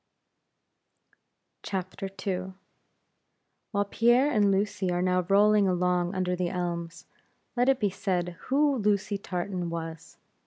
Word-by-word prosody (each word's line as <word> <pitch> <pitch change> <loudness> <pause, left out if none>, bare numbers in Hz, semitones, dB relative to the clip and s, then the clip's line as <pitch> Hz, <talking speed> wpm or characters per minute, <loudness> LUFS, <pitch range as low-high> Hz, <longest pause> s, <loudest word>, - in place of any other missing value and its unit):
II. 190 -2 0 1.9
While 205 -1 0
Pierre 240 +7 +3
and 210 -5 +3
Lucy 195 -1 0
are 175 - 0
now 185 0 +2
rolling 205 0 +5
along 180 0 +1
under 180 -1 0
the 180 -1 -1
elms, 170 -2 -4 0.5
let 245 +2 +3
it 270 -1 +3
be 205 -3 +1
said 185 -3 -1 0.2
who 285 +1 +3
Lucy 205 -1 0
Tartan 180 -1 -3
was. 165 -1 -7
190 Hz, 115 wpm, -28 LUFS, 180-210 Hz, 1.9 s, rolling